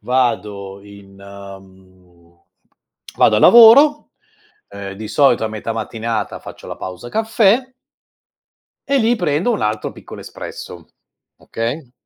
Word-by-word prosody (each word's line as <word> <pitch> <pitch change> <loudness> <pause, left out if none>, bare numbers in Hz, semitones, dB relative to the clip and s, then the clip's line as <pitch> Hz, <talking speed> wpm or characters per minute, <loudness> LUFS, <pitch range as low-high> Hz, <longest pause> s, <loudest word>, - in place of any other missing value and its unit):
Vado 105 -6 -2
in 100 -1 -16
mhmm, 95 -3 -16 0.8
vado 110 - +4
a - - +3
lavoro, 240 - +7 0.6
ehm, 100 -1 -8
di 110 +2 -8
solito 125 -1 +2
a - - -1
metà 110 +1 -5
mattinata 115 0 -4
faccio - - -12
la - - -7
pausa 95 +5 -8
caffè 225 - +1 1.2
e 280 -1 +2
lì 235 +1 +1
prendo 175 +4 0
un 220 - -2
altro 105 0 -2
piccolo - - -12
espresso, 85 -2 -10 0.5
okay, 120 +4 -5
110 Hz, 120 wpm, -18 LUFS, -, 1.2 s, lavoro